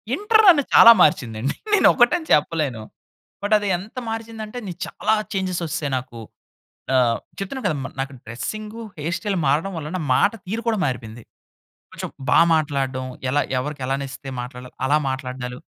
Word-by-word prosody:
Inter 435 Hz, +5 st, +3 dB
నన్ను 310 Hz, -6 st, +7 dB
చాలా 230 Hz, -, +10 dB
మార్చిందండి. 120 Hz, -3 st, +1 dB, 0.2 s
నేను 410 Hz, -, +6 dB
ఒకటని 315 Hz, +7 st, +3 dB
చెప్పలేను. 150 Hz, -6 st, +1 dB, 0.6 s
బట్, 210 Hz, +1 st, +3 dB
అది 205 Hz, -, -3 dB
ఎంత 205 Hz, +7 st, -12 dB
మార్చిందంటే, 225 Hz, 0 st, -6 dB
నీ 180 Hz, -, -5 dB
చాలా 215 Hz, +1 st, 0 dB, 0.2 s
చేంజస్ 185 Hz, -2 st, -2 dB
ఒచ్చేసాయి 145 Hz, -2 st, -3 dB
నాకు. 125 Hz, -2 st, -7 dB, 0.8 s
ఆహ్, 120 Hz, -2 st, +3 dB, 0.2 s
చెప్తున్నా 245 Hz, +7 st, -5 dB
కదా! 155 Hz, -, -1 dB
మ -, -, -2 dB
నాకు 135 Hz, +1 st, -4 dB
డ్రెస్సింగు, 215 Hz, -, -6 dB, 0.2 s
హెయిర్ 165 Hz, +4 st, -2 dB
స్టైల్ 205 Hz, -4 st, -1 dB
మారడం 165 Hz, +7 st, 0 dB
వల్ల 150 Hz, -1 st, -6 dB
నా -, -, -4 dB
మాట 205 Hz, -, +3 dB
తీరు 225 Hz, +4 st, -3 dB
కూడా 220 Hz, -3 st, +1 dB
మారిపోయింది. 115 Hz, -3 st, -5 dB, 0.7 s
కొంచెం -, -, -6 dB, 0.2 s
బా -, -, +6 dB, 0.2 s
మాట్లాడడం, 135 Hz, -4 st, -1 dB, 0.3 s
ఎలా 145 Hz, +2 st, +2 dB, 0.2 s
ఎవరికి 145 Hz, +1 st, -5 dB
ఎలా 135 Hz, +1 st, 0 dB
నచ్చితే 135 Hz, 0 st, -8 dB
మాట్లాడాలి 125 Hz, 0 st, -9 dB
అలా 150 Hz, +2 st, +4 dB
మాట్లాడడాలు. 125 Hz, -2 st, -5 dB
150 Hz, 155 wpm, -22 LUFS, 130-215 Hz, 0.8 s, చాలా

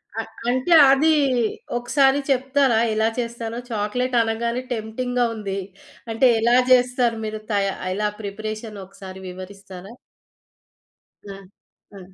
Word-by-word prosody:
అ 225 Hz, -, -1 dB, 0.3 s
అంటే 260 Hz, +7 st, -1 dB, 0.2 s
అది 295 Hz, +4 st, +4 dB, 0.7 s
ఒకసారి 270 Hz, +3 st, +2 dB
చెప్తారా 270 Hz, -2 st, +2 dB, 0.2 s
ఎలా 220 Hz, +1 st, +2 dB
చేస్తారో? 235 Hz, -1 st, -4 dB
చాక్లేట్ 235 Hz, +4 st, -2 dB
అనగానే 235 Hz, +2 st, -1 dB
టెంప్టింగ్‌గా 245 Hz, +3 st, -2 dB
ఉంది. 200 Hz, -2 st, -4 dB, 0.5 s
అంటే 225 Hz, +3 st, +3 dB
ఎలా 235 Hz, +2 st, +3 dB, 0.2 s
చేస్తారు? 250 Hz, -2 st, +3 dB
మీరు 215 Hz, 0 st, -4 dB
తయ 200 Hz, -1 st, +1 dB, 0.3 s
ఎలా 210 Hz, +2 st, -1 dB
ప్రిపరేషన్ 215 Hz, +1 st, -6 dB
ఒకసారి 190 Hz, 0 st, -11 dB
వివరిస్తారా? 190 Hz, +1 st, -10 dB, 1.3 s
ఆ! 200 Hz, -1 st, -8 dB, 0.6 s
ఆ! -, -, -10 dB
225 Hz, 110 wpm, -22 LUFS, 205-250 Hz, 1.3 s, అది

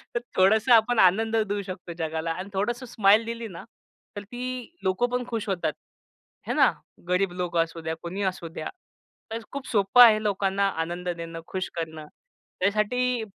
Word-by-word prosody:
तर -, -, +2 dB, 0.2 s
थोडंसं 220 Hz, +6 st, +5 dB
आपण 230 Hz, +1 st, +4 dB
आनंद 220 Hz, +5 st, +4 dB
देऊ 205 Hz, -2 st, 0 dB
शकतो 180 Hz, -2 st, -7 dB
जगाला 160 Hz, 0 st, -2 dB
आणि 185 Hz, +4 st, -5 dB
थोडंसं 240 Hz, +6 st, -1 dB
स्माईल 220 Hz, -2 st, +4 dB
दिली 230 Hz, 0 st, -5 dB
ना 180 Hz, -3 st, -9 dB, 0.5 s
तर 205 Hz, -, -5 dB
ती 245 Hz, +4 st, -8 dB, 0.4 s
लोकं 190 Hz, +6 st, +1 dB
पण 250 Hz, 0 st, -2 dB
खुश 225 Hz, -3 st, -3 dB
होतात, 175 Hz, -5 st, -1 dB, 0.7 s
आहे -, -, 0 dB
ना. -, -, +5 dB, 0.4 s
गरीब 180 Hz, 0 st, +2 dB
लोक 180 Hz, -1 st, -3 dB
असू 165 Hz, 0 st, 0 dB
द्या, 160 Hz, 0 st, -3 dB
कोणीही 190 Hz, +4 st, -4 dB
असू 185 Hz, -2 st, -3 dB
द्या, 160 Hz, -1 st, -6 dB, 0.6 s
तर 225 Hz, -, -2 dB
खूप 280 Hz, -1 st, -5 dB
सोपं 210 Hz, +3 st, +6 dB
आहे 215 Hz, -2 st, +6 dB
लोकांना 200 Hz, -1 st, +1 dB, 0.2 s
आनंद 175 Hz, +1 st, -5 dB
देणं, 165 Hz, -1 st, -5 dB
खुश 190 Hz, +1 st, -3 dB
करणं. 160 Hz, -2 st, -5 dB, 0.6 s
त्यासाठी 225 Hz, +5 st, +1 dB
195 Hz, 165 wpm, -26 LUFS, 175-225 Hz, 0.7 s, सोपं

